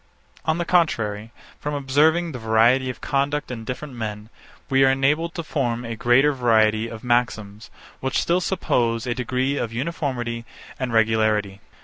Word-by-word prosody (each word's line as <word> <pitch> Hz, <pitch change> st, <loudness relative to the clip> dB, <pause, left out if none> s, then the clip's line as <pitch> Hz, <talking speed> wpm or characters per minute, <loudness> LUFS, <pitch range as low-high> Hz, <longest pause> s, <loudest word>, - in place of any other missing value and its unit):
On 160 Hz, 0 st, +1 dB
the 175 Hz, -, -2 dB
contrary, 110 Hz, -, +1 dB, 0.3 s
from 150 Hz, 0 st, -3 dB
observing 155 Hz, +5 st, +2 dB
the 125 Hz, -, -6 dB
variety 115 Hz, +4 st, +3 dB
of 125 Hz, -, -7 dB
conduct 145 Hz, 0 st, -1 dB
in 115 Hz, -3 st, -6 dB
different 130 Hz, +3 st, -6 dB
men, 110 Hz, -2 st, -6 dB, 0.4 s
we 135 Hz, 0 st, +3 dB
are 135 Hz, -, +6 dB
enabled 150 Hz, +5 st, +1 dB
to 170 Hz, -, -3 dB
form 125 Hz, -6 st, -2 dB
a 115 Hz, 0 st, -4 dB
greater 130 Hz, +6 st, +3 dB
variety 110 Hz, -3 st, +2 dB
of 115 Hz, -1 st, -9 dB
maxims, 110 Hz, -4 st, -1 dB, 0.3 s
which 130 Hz, -, -1 dB
still 175 Hz, +2 st, +1 dB
suppose 120 Hz, -11 st, 0 dB
a 120 Hz, -, -1 dB
degree 130 Hz, +3 st, -1 dB
of 115 Hz, -, -2 dB
uniformity 120 Hz, -3 st, -3 dB, 0.4 s
and 130 Hz, -2 st, -2 dB
regularity. 110 Hz, -3 st, +1 dB
125 Hz, 155 wpm, -23 LUFS, 115-145 Hz, 0.4 s, are